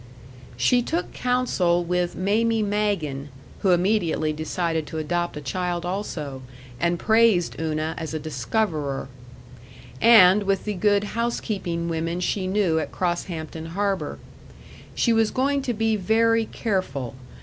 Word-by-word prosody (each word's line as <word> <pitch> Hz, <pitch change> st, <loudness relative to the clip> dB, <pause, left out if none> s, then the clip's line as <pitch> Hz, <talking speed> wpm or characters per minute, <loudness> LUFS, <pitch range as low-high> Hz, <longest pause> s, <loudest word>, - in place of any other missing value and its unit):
She 245 Hz, -, +3 dB
took 330 Hz, +8 st, -3 dB
counsel 220 Hz, -9 st, +1 dB
with 180 Hz, 0 st, -1 dB
Mamie 220 Hz, +4 st, +1 dB
Magen 200 Hz, -10 st, -1 dB, 0.3 s
(who 195 Hz, -, +1 dB
immediately 175 Hz, -4 st, +2 dB
decided 160 Hz, 0 st, -2 dB
to 160 Hz, -, -6 dB
adopt 175 Hz, +1 st, -2 dB
a -, -, -5 dB
child 175 Hz, +4 st, -2 dB
also, 160 Hz, -8 st, -4 dB, 0.4 s
and 170 Hz, 0 st, +1 dB
praised 220 Hz, -4 st, +3 dB
Una 155 Hz, 0 st, -1 dB
as 160 Hz, -1 st, -5 dB
a -, -, -2 dB
discoverer) 145 Hz, -, -2 dB, 0.9 s
and 210 Hz, -4 st, +7 dB
with 195 Hz, -1 st, 0 dB
the 210 Hz, -, -1 dB
good 205 Hz, +1 st, +2 dB
housekeeping 205 Hz, -6 st, -2 dB
women 165 Hz, +1 st, -2 dB
she 185 Hz, +1 st, -1 dB
knew 185 Hz, -5 st, +2 dB
at 155 Hz, -, -4 dB
Crosshampton 165 Hz, -2 st, -3 dB
Harbor. 200 Hz, 0 st, -1 dB, 0.8 s
She 235 Hz, -, +2 dB
was 225 Hz, -1 st, +3 dB
going 275 Hz, +2 st, +1 dB
to 250 Hz, -2 st, -2 dB
be 225 Hz, 0 st, +1 dB
very 225 Hz, +3 st, +2 dB
careful. 140 Hz, -, -2 dB
180 Hz, 130 wpm, -24 LUFS, 160-215 Hz, 0.9 s, and